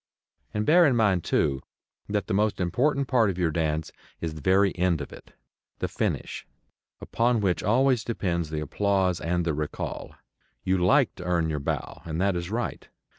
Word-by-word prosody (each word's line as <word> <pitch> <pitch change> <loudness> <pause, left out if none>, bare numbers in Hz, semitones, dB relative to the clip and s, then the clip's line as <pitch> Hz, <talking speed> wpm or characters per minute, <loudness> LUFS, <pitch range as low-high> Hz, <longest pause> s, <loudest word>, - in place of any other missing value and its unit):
And 105 0 -2
bear 170 +1 +6
in 130 - +2
mind, 100 -7 +2
too, 70 -3 +1 0.5
that 105 -1 0
the 110 - -3
most 105 +2 +1
important 135 - +1
part 120 -5 +3
of 90 - -3
your 85 -3 +1
dance 80 0 -1 0.3
is 80 -2 -3
the 75 - -9
very 95 +4 +3
end 90 -3 +1
of 70 - -7
it, - - -15 0.4
the - - -2
finish, - - -3 0.6
upon 120 0 +1
which 95 -4 0
always 125 +2 +3
depends 85 -8 -2
the 75 -1 -3
applause 95 +3 0
and 85 +1 0
the 85 - 0
recall. 75 0 -5 0.5
You 95 0 +1
like 110 +9 +3
to 90 - -7
earn 85 -3 +1
your 75 - -2
bow, 70 - -4
and 80 0 -4
that 100 0 +2
is 85 0 -3
right. 120 +3 -4
95 Hz, 180 wpm, -26 LUFS, 85-110 Hz, 0.6 s, bear